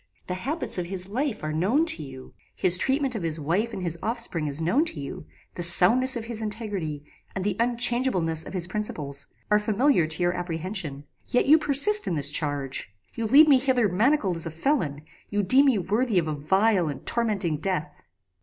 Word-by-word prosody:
The 180 Hz, -, -4 dB
habits 265 Hz, -, -3 dB
of 175 Hz, -, -4 dB
his 185 Hz, 0 st, -6 dB
life 245 Hz, -, -3 dB
are 155 Hz, 0 st, -3 dB
known 210 Hz, -, +1 dB
to 320 Hz, -, 0 dB
you; 130 Hz, -3 st, -11 dB, 0.2 s
his 180 Hz, -1 st, +4 dB
treatment 265 Hz, +6 st, 0 dB
of 220 Hz, -, -4 dB
his 165 Hz, -1 st, -2 dB
wife 180 Hz, +10 st, -1 dB
and 190 Hz, -, -6 dB
his 170 Hz, -1 st, -1 dB
offspring 220 Hz, -9 st, -3 dB
is 145 Hz, +1 st, 0 dB
known 175 Hz, -, +1 dB
to 175 Hz, -, -2 dB
you; 140 Hz, +2 st, -8 dB, 0.3 s
the -, -, -7 dB
soundness 225 Hz, +10 st, +5 dB
of 230 Hz, -2 st, -5 dB
his 230 Hz, -1 st, -3 dB
integrity, 205 Hz, -9 st, -5 dB, 0.3 s
and 190 Hz, -, -3 dB
the 200 Hz, -1 st, -1 dB
unchangeableness 235 Hz, -9 st, +1 dB
of -, -, -10 dB
his 180 Hz, -3 st, +1 dB
principles, 150 Hz, -9 st, -3 dB, 0.2 s
are 210 Hz, -, +4 dB
familiar 210 Hz, -, +1 dB
to 160 Hz, +3 st, 0 dB
your 175 Hz, 0 st, +1 dB
apprehension; 175 Hz, -4 st, -5 dB, 0.3 s
yet 245 Hz, -, +1 dB
you 310 Hz, +3 st, +5 dB
persist 310 Hz, +9 st, +5 dB
in 170 Hz, -, -1 dB
this 145 Hz, -1 st, 0 dB
charge! 145 Hz, -7 st, -3 dB, 0.2 s
You 230 Hz, -1 st, -3 dB
lead 290 Hz, +7 st, +6 dB
me 275 Hz, -3 st, +5 dB
hither 255 Hz, -4 st, +1 dB
manacled 205 Hz, -, +1 dB
as 165 Hz, -, 0 dB
a -, -, -4 dB
felon; 160 Hz, -, -2 dB, 0.3 s
you 205 Hz, 0 st, -1 dB
deem 265 Hz, +9 st, +5 dB
me 255 Hz, -5 st, +3 dB
worthy 210 Hz, +4 st, -1 dB
of 165 Hz, -3 st, +1 dB
a 155 Hz, -, -2 dB
vile 190 Hz, +5 st, +1 dB
and 145 Hz, -, -7 dB
tormenting 205 Hz, -9 st, -1 dB
death! 155 Hz, -5 st, -3 dB
190 Hz, 200 wpm, -25 LUFS, 160-240 Hz, 0.3 s, lead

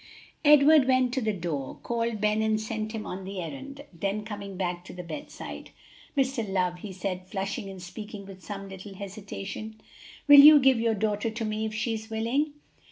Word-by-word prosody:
Edward 295 Hz, -1 st, +7 dB
went 255 Hz, -1 st, +3 dB
to 265 Hz, -, 0 dB
the 220 Hz, -2 st, +1 dB
door, 165 Hz, -8 st, -4 dB
called 230 Hz, -2 st, -1 dB
Ben 210 Hz, +1 st, +2 dB
and 220 Hz, 0 st, +1 dB
sent 215 Hz, 0 st, -4 dB
him 220 Hz, -1 st, -5 dB
on 190 Hz, +1 st, -6 dB
the 195 Hz, 0 st, -6 dB
errand, 275 Hz, +9 st, -7 dB
then 200 Hz, +5 st, -2 dB
coming 200 Hz, -3 st, -7 dB
back 175 Hz, -2 st, -2 dB
to -, -, -10 dB
the 180 Hz, 0 st, -7 dB
bedside, 285 Hz, -, -8 dB, 0.5 s
"Mr. 260 Hz, -6 st, 0 dB
Love," 180 Hz, -2 st, 0 dB
he 200 Hz, +1 st, -7 dB
said, 185 Hz, 0 st, -4 dB
flushing 195 Hz, 0 st, -4 dB
and 190 Hz, -1 st, -9 dB
speaking 210 Hz, +2 st, -8 dB
with 190 Hz, -2 st, -12 dB
some 195 Hz, +3 st, -6 dB
little 195 Hz, +1 st, -9 dB
hesitation, 200 Hz, +2 st, -7 dB, 0.5 s
"will 290 Hz, -1 st, +10 dB
you 295 Hz, +1 st, +11 dB
give 260 Hz, -3 st, +4 dB
your 225 Hz, -1 st, +1 dB
daughter 210 Hz, +1 st, 0 dB
to 225 Hz, +1 st, -4 dB
me 215 Hz, 0 st, -1 dB
if 215 Hz, -, -6 dB
she 225 Hz, +1 st, -1 dB
is 220 Hz, 0 st, -6 dB
willing?" 240 Hz, +7 st, 0 dB
215 Hz, 190 wpm, -27 LUFS, 195-235 Hz, 0.5 s, you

